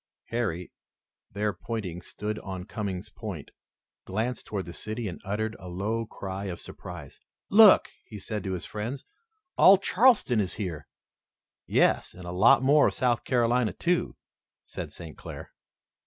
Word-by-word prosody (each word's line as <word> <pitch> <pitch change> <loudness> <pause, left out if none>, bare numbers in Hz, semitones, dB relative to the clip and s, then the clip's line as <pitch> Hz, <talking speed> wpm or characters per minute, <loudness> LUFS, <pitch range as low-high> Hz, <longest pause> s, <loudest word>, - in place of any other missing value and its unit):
Harry 100 -7 -2 0.6
their 105 +1 -1
battery 90 -2 -5
stood 105 +4 -5
on 95 -2 -6
Coming's 100 -2 -5
Point 100 -10 -7 0.5
glanced 110 +5 -3
toward 100 -3 -3
the 85 - -8
city 110 +3 -4
and 90 - -7
uttered 110 +3 -2
a 90 - -10
low 105 +5 -2
cry 95 -1 -6
of 90 -3 -5
surprise. - - -10 0.3
"Look!" 210 0 +8 0.2
he 105 - -8
said 105 0 -5
to 95 - -2
his 90 - -3
friends, 115 +6 -5 0.5
"all 195 +1 +9
Charleston 200 - +4
is 95 -4 -1
here." 85 -9 -5 0.8
"Yes, - - +2
and 90 -1 -10
a 90 - -5
lot 115 +8 +5
more 145 +2 +5
of - - -2
South 125 -3 +1
Carolina, 120 -2 +2
too," 175 0 0 0.5
said - - -7
St. 80 -4 -9
Clair. - - -9
105 Hz, 150 wpm, -27 LUFS, 95-120 Hz, 0.8 s, all